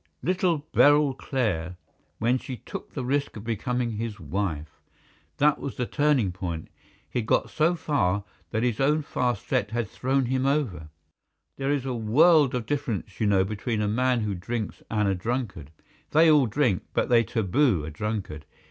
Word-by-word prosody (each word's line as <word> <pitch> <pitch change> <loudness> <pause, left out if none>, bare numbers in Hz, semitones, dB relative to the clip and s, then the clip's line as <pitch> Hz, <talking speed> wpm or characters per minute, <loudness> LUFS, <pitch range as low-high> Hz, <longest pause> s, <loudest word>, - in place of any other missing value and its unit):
"Little 175 -2 +1
Beryl 145 -1 +5
Clare, 90 - -2 0.4
when 120 +3 +1
she 130 -1 -7
took - - -9
the 130 - -3
risk 140 -1 -1
of 105 - -8
becoming 120 +1 -1
his 110 0 -4
wife. 80 -3 -4 0.6
That 150 0 +3
was 140 - -5
the 125 - -1
turning 145 -8 +2
point. 90 -3 -5 0.4
He - - -2
had 110 - -4
got - - +1
so 165 +3 +2
far 100 - 0 0.3
that 110 0 -1
his 120 -3 0
own 150 +3 +2
fast 125 -6 -2
set - - 0
had 115 0 -2
thrown 135 +3 0
him 130 +2 0
over. 110 - -1 0.7
There 135 0 -2
is 140 -3 0
a 130 - -2
world 135 +5 +4
of 120 -3 -2
difference, 130 -5 -3
you 110 - +2
know, 95 -2 +4
between 105 +3 -3
a 105 - 0
man 125 +3 +1
who 105 -2 -1
drinks 105 +5 -4
and 105 -2 +1
a 100 - +2
drunkard. 100 - -3 0.4
They 160 +1 +5
all 145 -5 +5
drink, 115 -4 +1
but - - +2
they 120 -1 +5
taboo 110 - +1
a 80 - -6
drunkard. 90 -4 -4
120 Hz, 175 wpm, -26 LUFS, 100-135 Hz, 0.7 s, Beryl